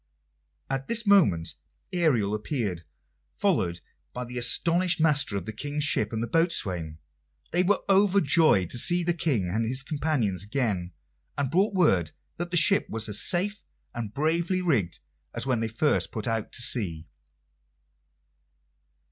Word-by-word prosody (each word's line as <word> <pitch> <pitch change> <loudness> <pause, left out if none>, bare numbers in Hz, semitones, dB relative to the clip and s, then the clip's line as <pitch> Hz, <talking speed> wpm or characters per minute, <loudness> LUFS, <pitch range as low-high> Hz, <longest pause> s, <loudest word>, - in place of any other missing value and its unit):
At 135 0 -4
this 230 -1 0
moment 165 - +3 0.4
Ariel 130 - +1
appeared, 105 - -3 0.5
followed 90 - 0 0.3
by 125 0 -4
the 125 +1 -6
astonished 175 +8 +1
master 145 -9 +2
of 90 - -6
the 110 - -6
King's 145 +6 -3
ship 110 -7 0
and 110 0 -3
the - - -3
boatswain. 95 - -1 0.5
They 175 - +2
were 195 +3 +1
overjoyed 175 - +3
to 120 - +3
see 175 +6 +3
the 175 +1 0
King 140 - -1
and 110 +6 -1
his 130 +4 -2
companions 140 - -1
again, 100 -5 -2 0.4
and 140 -2 -2
brought 195 +5 +1
word 95 - +2 0.2
that 175 +1 -4
the 175 - 0
ship 185 +5 +3
was 110 0 -2
as 105 - +2
safe 200 +3 -1 0.3
and 115 -4 -5
bravely 165 - 0
rigged 130 - 0 0.4
as - - -2
when 130 -3 0
they 115 - -1
first 115 +7 0
put 110 -3 -4
out 115 -2 -2
to 125 - +4
sea. 85 -10 +3
135 Hz, 150 wpm, -26 LUFS, 105-170 Hz, 0.5 s, to